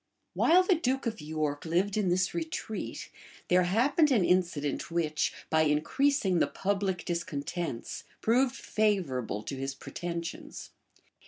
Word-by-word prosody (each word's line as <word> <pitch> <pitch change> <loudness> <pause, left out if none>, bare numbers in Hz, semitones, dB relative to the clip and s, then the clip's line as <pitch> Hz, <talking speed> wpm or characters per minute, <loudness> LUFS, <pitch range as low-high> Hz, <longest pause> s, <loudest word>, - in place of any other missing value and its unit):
[*] - - -50
While 360 +3 +5
the 370 - +4
duke 270 -5 0
of 225 -2 -3
York 150 -1 -2
lived 180 +5 +1
in 210 -4 +1
this 185 +1 +1
retreat, 320 -9 -4 0.4
there 180 +1 +5
happened 245 - +3
an 225 -10 +3
incident 170 -6 0
which, 160 -3 0 0.2
by 160 - +4
increasing 185 - +2
the - - +3
public 195 -2 -1
discontents, 170 -4 -4 0.2
proved 250 +3 +2
favorable 150 - 0
to 135 - -5
his 135 +1 -4
pretensions. 170 +2 -6
180 Hz, 135 wpm, -30 LUFS, 155-225 Hz, 0.4 s, While